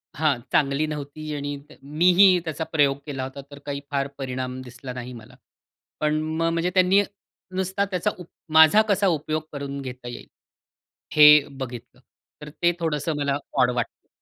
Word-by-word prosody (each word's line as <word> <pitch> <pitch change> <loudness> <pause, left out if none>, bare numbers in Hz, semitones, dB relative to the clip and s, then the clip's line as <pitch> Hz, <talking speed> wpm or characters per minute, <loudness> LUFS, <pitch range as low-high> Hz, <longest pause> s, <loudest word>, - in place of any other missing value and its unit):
हां. 150 -3 +1
चांगली 140 +1 +2
नव्हती 150 +1 -6
आणि 145 0 -4 0.3
मीही 180 +5 +5
त्याचा 160 0 -3
प्रयोग 140 -3 +3
केला 135 -3 -4
होता, 135 +1 -7
तर 145 - -10
काही 140 -1 -3
फार 140 -1 0
परिणाम 130 -1 -4
दिसला 125 +1 -9
नाही 125 0 -7
मला. 120 +1 -13 0.7
पण 155 0 +1
मग 160 +1 -2
म 165 - +2
म्हणजे 170 +2 0
त्यांनी 185 +2 +5 0.5
नुसता 190 +1 0
त्याचा 185 +3 0
उप 180 - -10 0.3
माझा 160 +7 +8
कसा 200 0 +2
उपयोग 155 -2 0
करून 140 -1 -5
घेता 125 -2 -8
येईल 120 - -8 0.9
हे 150 - +9 0.4
बघितलं. 125 -2 -8 0.4
तर 150 - -8
ते 175 0 +4
थोडंसं 160 -1 -1
मला 140 -1 0 0.3
ऑड 125 - +4
वाटलं. 120 -1 -4
145 Hz, 160 wpm, -24 LUFS, 135-165 Hz, 0.9 s, हे